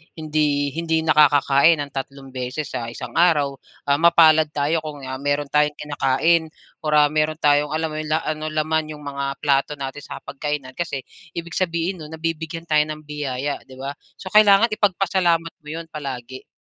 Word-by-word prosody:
hindi 150 -3 0
hindi 160 +1 -1
nakakakain 145 0 +5
ng 145 -2 -5
tatlong 135 0 -7
beses 130 +3 -4
sa 115 - -4
isang 120 0 -7
araw. 145 -6 +3 0.2
Ah, 140 +1 +1
mapalad 160 -2 +6
tayo 150 +3 +1
kung, 150 -3 -8
ah, 130 0 -5
meron 145 0 -1
tayong 150 0 +2
kinakain 150 +3 +1 0.3
or 150 -2 0
ah, 150 0 +5
meron 155 0 +1
tayong, 145 -1 +3
alam 160 0 -1
mo 155 - -4
'yon 155 - -4
la 155 +1 0
ano, 155 0 -3
laman 155 0 -1
'yong 150 - -13
mga 140 -1 -4 0.2
plato 140 0 +2
natin 140 0 -6
sa - - -9
hapagkainan. 140 -1 -4
Kasi 140 -3 -4 0.3
ibig 170 0 -5
sabihin 170 +1 -1
nun 155 +1 -8
nabibigyan 165 0 -4
tayo 155 -2 +2
ng 155 0 -7
biyaya, 145 -2 -3
'di 130 - -13
ba? 135 +2 -5 0.2
So, 185 - -9
kailangan 210 +1 +6
ipagpasalamat 180 -5 +1
mo 150 - -19
'yon 165 +2 -5
palagi. 130 -3 -7
150 Hz, 175 wpm, -22 LUFS, 140-160 Hz, 0.3 s, mapalad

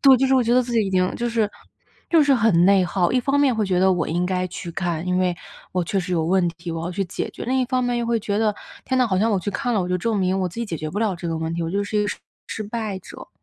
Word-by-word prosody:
对， 270 -2 +8
就 270 - +3
是 265 - +3
我 255 - +4
觉 235 +1 +2
得 255 - +5
自 240 0 -6
己 220 -3 +2
已 - - -3
经 185 -1 +1
就 240 0 -1
是 225 -3 0 0.6
就 330 -3 +5
是 285 -1 +4
很 210 -8 +4
内 195 -1 +5
耗， 180 0 +1
一 255 - +3
方 275 +3 +1
面 270 -4 +3
会 220 -2 0
觉 185 -2 +1
得 190 0 +5
我 175 -3 0
应 175 +3 0
该 185 0 -1
去 175 -1 -7
看， 170 -2 -2
因 180 0 +1
为 180 -1 +1 0.4
我 180 - 0
确 195 - -1
实 180 0 -4
有 165 -2 +1
问 180 +1 +2
题， 170 +1 -8
我 165 0 -4
要 175 - -3
去 195 +2 -1
解 - - -4
决。 - - -8
另 260 +2 0
一 - - +2
方 255 0 0
面 245 0 0
又 235 - -2
会 235 -1 +1
觉 205 0 -1
得， 215 -2 +1 0.3
天 260 - -1
呐， 255 - +4
好 190 -4 0
像 220 +4 +2
我 195 - +2
去 205 - -3
看 245 +3 -1
了， 205 - +2
我 180 - -2
就 180 - 0
证 225 +3 -1
明 190 0 +1
我 185 - 0
自 170 - -14
己 235 - -2
解 170 -5 -4
决 155 +1 -4
不 205 - -3
了 215 -4 +1
这 170 0 -6
个 165 - -2
问 160 0 -3
题， 170 0 -2
我 165 - -2
就 200 +3 0
是 210 - -3
一 - - +3
个 205 - -1
失 - - -4 0.3
失 220 - -5
败 215 -2 -4
者。 - - -12
195 Hz, 360 characters per minute, -22 LUFS, 180-235 Hz, 0.6 s, 对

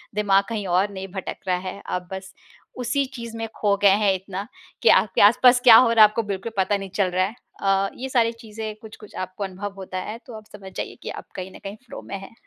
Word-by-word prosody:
दिमाग 200 -1 +3
कहीं 210 -3 -3
और 185 +3 +2
नहीं 190 0 -6
भटक 190 - -5
रहा 180 -1 +2
है। 200 - -6
आप 180 -1 -3
बस 190 0 -7 0.5
उसी 250 +3 0
चीज़ 235 -1 -7
में 225 0 -3
खो 205 -2 +2
गए 200 - +7
हैं 195 -1 +4
इतना, 195 +2 -6 0.3
कि 230 - +5
आपके 190 -1 +4
आस-पास 245 +4 +6
क्या 235 -3 +10
हो 250 -2 +6
रहा 225 -1 +5
है 210 - +8
आपको 225 +1 -2
बिल्कुल 200 +2 -4
पता 195 +2 +2
नहीं 195 -1 -7
चल 195 -3 +2
रहा 185 +1 +2
है। 215 +5 -6 0.3
अ, 195 0 +2
ये 265 +1 -5
सारी 230 -3 +2
चीज़ें 220 -1 -7
कुछ-कुछ 215 -1 -13
आपको 185 +2 -5
अनुभव 195 +1 -5
होता 185 -1 -6
है 215 +4 -6
तो 245 - -11
आप 215 - -13
समझ 190 -2 -11
जाइए - - -5
कि - - -5
आप - - -7
कहीं 185 0 -6
न - - -11
कहीं 195 +1 -6
फ़्लो - - -9
में 195 - -4
हैं। 195 - -12
200 Hz, 245 wpm, -23 LUFS, 190-225 Hz, 0.5 s, क्या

